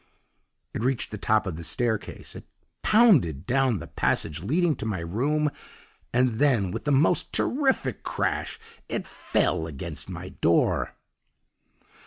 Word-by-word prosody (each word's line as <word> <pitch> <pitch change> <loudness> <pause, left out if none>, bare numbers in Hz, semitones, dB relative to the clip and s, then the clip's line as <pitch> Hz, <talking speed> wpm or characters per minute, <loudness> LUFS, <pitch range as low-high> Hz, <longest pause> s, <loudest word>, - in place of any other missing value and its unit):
"It - - -3
reached 130 0 -1
the 105 - -6
top 110 +1 +2
of 90 -5 -4
the 85 - -7
staircase, 110 +4 -2
it - - -9 0.4
pounded 150 - +4
down 130 -1 +2
the 80 - -7
passage 75 +1 -1
leading 155 - +1
to - - -5
my 105 -4 -1
room; 140 - 0 0.6
and 120 -2 +1
then, 120 -11 +3
with - - -5
the 145 - +1
most 150 +5 +3
terrific 260 - 0
crash, - - -2 0.3
it - - -3
FELL 80 - -1
against 70 -4 -5
my - - -6
door! 85 - +1
120 Hz, 140 wpm, -26 LUFS, 95-145 Hz, 0.6 s, pounded